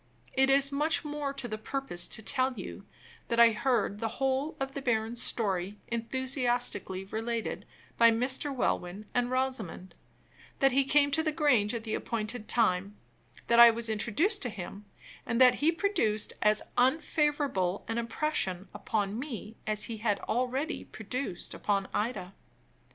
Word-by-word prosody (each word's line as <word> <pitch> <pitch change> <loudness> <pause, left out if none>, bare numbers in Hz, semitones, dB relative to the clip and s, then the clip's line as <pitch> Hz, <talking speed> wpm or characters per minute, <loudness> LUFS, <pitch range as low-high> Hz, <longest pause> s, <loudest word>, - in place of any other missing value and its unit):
It 265 0 +3
is 275 +1 +4
much 300 +3 +1
more 295 -1 -3
to 270 -3 -3
the 215 -1 -5
purpose 245 -8 -1
to 220 - -3
tell 260 +3 +1
you 200 -2 -9 0.4
that 235 - 0
I 235 -1 +8
heard 215 -3 0
the 225 - -1
whole 270 +3 -1
of 270 0 -3
the 275 - -4
baron's 230 -2 0
story 195 -3 0
enthusiastically 240 -5 -1
related 225 +3 -4 0.3
by 230 0 +8
Mr. 255 +5 +1
Welwyn 205 -6 -2
and 245 0 +1
Rosamond; 255 -9 -2 0.6
that 270 0 +4
he 270 +1 +2
came 285 +1 +3
to 320 - +3
the 315 -1 0
Grange 250 -9 +2
at 230 - -4
the 220 - -4
appointed 220 0 -4
time; 200 -3 +1 0.5
that 235 0 +3
I 235 0 +11
was 230 0 0
introduced 235 - 0
to 245 - +1
him; 200 0 -8 0.4
and 230 0 -2
that 255 +1 +6
he 310 +3 +4
produced 330 - 0
as 210 0 +4 0.2
unfavorable 275 - +1
an 225 +1 -2
impression 225 - -2
upon 205 0 -2
me 230 -6 -7
as 215 -1 +3
he 230 - -4
had 210 -2 0
already 255 +7 -2
produced 220 -3 -5
upon 200 -2 -1
Ida. 210 -4 -2
235 Hz, 155 wpm, -29 LUFS, 210-270 Hz, 0.6 s, I